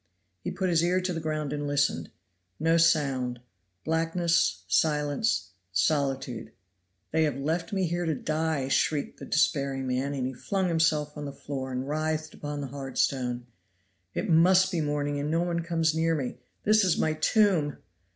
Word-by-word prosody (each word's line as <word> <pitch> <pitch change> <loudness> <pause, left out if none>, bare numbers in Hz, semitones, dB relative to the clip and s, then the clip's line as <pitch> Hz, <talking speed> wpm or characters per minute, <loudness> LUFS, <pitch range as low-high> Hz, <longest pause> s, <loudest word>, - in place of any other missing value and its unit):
He - - -2
put 185 -2 -1
his 165 -1 +3
ear 180 +2 +2
to 185 0 -2
the 165 - -3
ground 155 -2 -2
and 145 0 -3
listened; 140 - +1 0.5
no 165 +1 +3
sound 135 -7 +2 0.5
blackness, 165 +1 +1
silence, 150 - +1 0.2
solitude. 135 - 0 0.6
"They 160 - +2
have 150 -3 +1
left 160 +4 -2
me 195 -2 0
here 175 0 -1
to 160 - +1
die," 155 -2 -1
shrieked 145 +2 0
the - - -7
despairing 140 -3 +1
man, 130 +3 -1
and 130 -2 -1
he 130 - -3
flung 190 - -1
himself 155 -3 +1
on 150 -1 -5
the 140 - -4
floor 135 -1 -5
and 130 +1 -3
writhed 155 +1 -2
upon 145 0 -5
the 140 - -4
hard 135 -2 -6
stone. 125 -2 0 0.7
"It - - -1
must 185 +2 +5
be 170 -4 0
morning, 145 -1 -1
and 145 +1 -2
no 165 +2 +2
one 170 -1 -1
comes 165 -2 +1
near 165 +1 +1
me; 130 -4 -4 0.2
this 215 0 +4
is 185 -4 +2
my 155 - +1
tomb!" 175 - +2
155 Hz, 170 wpm, -28 LUFS, 140-165 Hz, 0.7 s, must